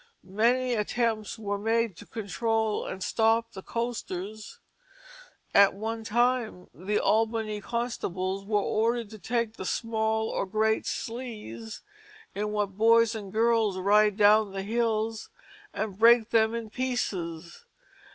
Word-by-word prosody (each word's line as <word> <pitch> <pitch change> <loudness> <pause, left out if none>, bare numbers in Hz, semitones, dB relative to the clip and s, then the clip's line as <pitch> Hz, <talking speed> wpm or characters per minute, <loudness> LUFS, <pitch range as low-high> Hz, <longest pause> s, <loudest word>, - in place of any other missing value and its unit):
Many 240 +6 +1
attempts 225 0 -1
were 205 -2 -3
made 225 -1 0
to - - -12
control 220 +1 -1
and 190 0 -5
stop 225 0 +2
the 190 - -9
coasters. 215 -3 -5 1.0
At 200 -1 +6
one 225 +2 -4
time 235 -4 0
the 195 +6 -2
Albany 220 -1 0
constables 195 -5 -3
were 205 0 +1
ordered 230 0 0
to 215 - -10
take 230 0 -2
the - - -5
"small 220 +2 -1
or - - -2
great 220 +2 +1
slees" 225 -2 -6 0.5
in 210 +1 -2
which 210 -1 0
"boys 230 +3 +4
and 205 -4 -7
girls 225 -3 +2
ryde 205 +2 +3
down 210 -1 +5
the 195 0 -4
hills," 225 0 -1 0.4
and 210 -3 -4
break 230 0 +6
them 225 0 +3
in 225 -2 -5
pieces. 180 -10 -3
220 Hz, 130 wpm, -27 LUFS, 205-230 Hz, 1.0 s, At